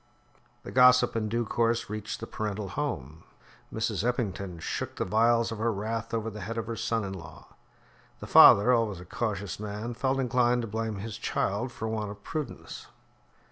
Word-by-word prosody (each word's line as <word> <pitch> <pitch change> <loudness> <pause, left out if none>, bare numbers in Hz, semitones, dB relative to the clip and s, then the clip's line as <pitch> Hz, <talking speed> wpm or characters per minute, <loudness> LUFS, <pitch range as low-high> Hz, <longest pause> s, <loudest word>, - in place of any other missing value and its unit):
The - - -8
gossip, 125 -1 +5
in 110 -1 -1
due 115 +2 0
course, 115 +1 0
reached 105 0 -5
the - - -3
parental 105 -2 -4
home. 85 - -4 0.5
Mrs. 110 -3 -1
Eppington 100 -7 -2
shook - - -4
the - - -2
vials 115 +4 +3
of 115 - -5
her 115 +1 +1
wrath 110 +2 -3
over 115 -1 -2
the 105 0 -8
head 115 +5 -5
of 115 - -2
her 115 0 -4
son 115 0 -1
in 95 -1 -4
law. 95 -4 -11 0.7
The - - -7
father, 105 +5 +8
always 110 -6 +1
a 90 - -10
cautious 100 -1 -3
man, 105 +3 -5
felt 130 +3 0
inclined 125 -1 +2
to - - -4
blame 110 0 -3
his 110 +3 -6
child 110 +2 -1
for 110 - -5
her 110 - -2
want 105 -2 -2
of 100 0 -10
prudence. 150 -5 -6
110 Hz, 185 wpm, -28 LUFS, 100-120 Hz, 0.7 s, father